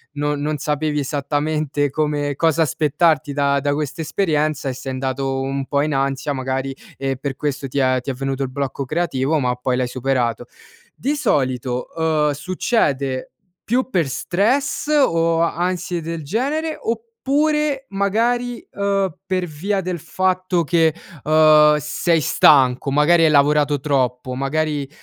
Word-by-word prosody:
non 145 0 -1
non 150 +1 -1
sapevi 150 +1 -1
esattamente 145 +1 -1
come 145 -1 -1
cosa 165 +2 +2
aspettarti 150 0 +1
da 140 0 +1
da 145 +1 0
questa 150 +2 -3
esperienza, 155 -4 0
e 130 - -1
sei 130 +1 -6
andato 135 +1 -2
un 135 0 -2
po' 140 - 0
in 155 0 -1
ansia 135 +1 -1
magari, 130 0 -3 0.2
e 135 -1 -2
per 135 +1 -5
questo 140 -2 -3
ti 140 - -2
è 130 -1 +2
ti 125 - -6
è - - -1
venuto 135 +1 -3
il 135 - -3
blocco 140 0 -3
creativo, 150 0 0
ma 125 -2 0
poi 125 0 -1
l'hai 125 -1 0
superato. 125 -2 -1 0.5
Di 285 +4 -2
solito, 130 - -1
uhm, 155 -2 +1
succede 140 - -1 0.3
più 255 +3 0
per 170 - 0
stress, 240 - 0
o 165 - +3
ansie 175 +1 -1
del 165 -1 -5
genere, 290 - -1
oppure 275 +5 -1
magari, 235 +5 0
uhm, 195 -3 0
per 185 -1 -1
via 180 +6 -2
del 180 -2 -3
fatto 185 -1 0
che, 165 0 +3 0.3
uhm, 155 0 +6
sei 165 +3 0
stanco, 135 -2 +4
magari 165 +4 +4
hai 155 - +5
lavorato 145 0 +3
troppo, 130 -3 -1
magari, 145 +1 -1
150 Hz, 145 wpm, -20 LUFS, 135-175 Hz, 0.5 s, uhm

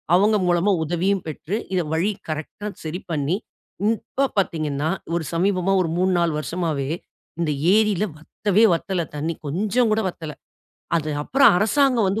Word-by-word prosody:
அவங்க 205 +4 +4
மூலமா 175 +3 +3
உதவியும் 180 +4 0
பெற்று 155 +5 -4 0.4
வழி 180 +7 +1 0.2
கரெக்ட்டா 160 +7 -5 0.2
சரி 165 +4 -4
பண்ணி, 155 +4 0 0.6
இப்ப 255 +5 -2
பார்த்தீங்கன்னா 155 -5 -1 0.3
ஒரு 170 - -1
சமீபமா 185 +2 +1
ஒரு 170 - -1
3 185 0 +2
4 170 -1 +2
வருஷமவே 155 -4 -2 0.5
இந்த 160 -3 +1 0.2
ஏரியில 210 -3 +3
வத்தவே 205 +7 +1
வத்தல 180 +1 -2
தண்ணீ 155 +3 -2
கொஞ்சம் 210 - +1
கூட 215 +1 +2
வத்தல. 160 -3 -7 0.7
அது 155 -2 -1
அப்புறம் 270 - +5
அரசாங்கம் 240 +1 +3
வந்து 200 +4 0
180 Hz, 140 wpm, -23 LUFS, 160-210 Hz, 0.7 s, அப்புறம்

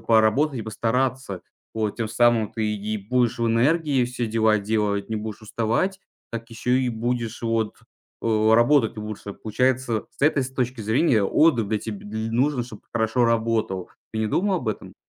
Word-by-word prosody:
поработать 115 +6 +3
и - - -4
постараться. 115 -1 -1 0.3
Вот 110 -2 -2
тем 115 -2 -1
самым 115 -2 +3
ты 110 -2 -1
и 105 +1 -3
будешь 120 +4 0
в 115 - +2
энергии 135 +3 +2
все 125 -1 -3
дела 110 -1 +3
делать, 105 -1 -1
не 110 - -1
будешь 110 0 -6
уставать, 115 - -1 0.3
так 115 0 -5
еще 125 +3 +1
и 125 - 0
будешь 120 0 -2
вот, 115 -2 0 0.4
о 110 -1 +3
работать 120 -1 +4
лучше. 105 -1 -6
Получается, 120 0 0
с - - -8
этой 145 -2 +4
с 130 - -6
точки 125 -2 -2
зрения 110 +1 +2
отдых 120 -5 +3
для 110 -1 0
теб 110 -1 -5
дл 110 +2 -5
нужен, 130 0 +2
чтобы 110 -4 -11
хорошо 115 +2 +1
работал. 110 -5 0 0.2
Ты 110 - -3
не 110 - +1
думал 190 - +1
об 125 -9 -3
этом? 105 - -5
115 Hz, 175 wpm, -24 LUFS, 110-125 Hz, 0.4 s, работать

